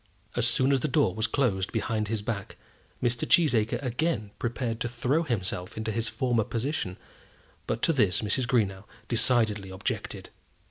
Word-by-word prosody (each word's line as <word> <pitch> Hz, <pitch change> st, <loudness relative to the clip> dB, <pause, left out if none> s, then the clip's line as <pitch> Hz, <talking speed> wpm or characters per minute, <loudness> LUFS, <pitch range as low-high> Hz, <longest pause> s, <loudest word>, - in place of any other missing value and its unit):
As 120 Hz, -1 st, +2 dB
soon 130 Hz, +2 st, +3 dB
as 135 Hz, -, +4 dB
the 140 Hz, -, 0 dB
door 110 Hz, -9 st, +2 dB
was 110 Hz, +4 st, 0 dB
closed 100 Hz, -9 st, 0 dB
behind 110 Hz, -2 st, -1 dB
his 105 Hz, -1 st, -2 dB
back, 105 Hz, -3 st, -4 dB, 0.5 s
Mr. 120 Hz, -1 st, 0 dB
Cheesacre 120 Hz, -9 st, +4 dB
again 125 Hz, -4 st, -1 dB
prepared 115 Hz, -1 st, -2 dB
to 120 Hz, -, -1 dB
throw 125 Hz, +6 st, +1 dB
himself 95 Hz, -, -3 dB
into 110 Hz, 0 st, -2 dB
his 115 Hz, +1 st, -1 dB
former 120 Hz, -4 st, +1 dB
position, 115 Hz, -4 st, -2 dB, 0.7 s
but 115 Hz, -, -2 dB
to 165 Hz, -, +4 dB
this 105 Hz, -, +2 dB
Mrs. 120 Hz, +4 st, 0 dB
Greenow 100 Hz, -6 st, +1 dB, 0.2 s
decidedly 110 Hz, -4 st, +2 dB
objected. 95 Hz, 0 st, -4 dB
115 Hz, 155 wpm, -28 LUFS, 105-125 Hz, 0.7 s, as